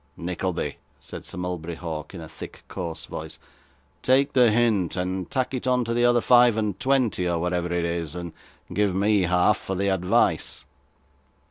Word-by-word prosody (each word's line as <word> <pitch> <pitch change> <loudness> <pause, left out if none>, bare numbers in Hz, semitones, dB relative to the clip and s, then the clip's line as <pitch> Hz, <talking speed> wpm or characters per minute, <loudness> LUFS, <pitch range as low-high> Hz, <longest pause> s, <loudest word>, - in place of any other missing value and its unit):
'Nickleby,' 90 -3 -3 0.2
said - - -9
Sir - - -8
Mulberry 90 -2 -4
Hawk, 80 0 -6
in 85 - -7
a 80 - -8
thick 80 - -10
coarse 85 -4 -5
voice, - - -7 0.6
'take 135 +2 +3
the 125 -3 +6
hint, 110 -5 +2
and 90 0 -3
tack 130 0 -1
it 130 0 -3
on 125 -1 +3
the 120 +1 +1
other 120 0 +4
five 120 -2 +5
and 105 -3 -1
twenty, 125 -9 +1
or 85 - 0
whatever 90 0 -1
it 85 -1 0
is, 85 -2 -3
and 85 -2 -6 0.4
give 100 -3 +1
me 100 +1 +3
half 90 +3 +3
for 95 - -5
the 100 +2 0
advice. 90 -7 +1
95 Hz, 170 wpm, -25 LUFS, 85-115 Hz, 0.6 s, the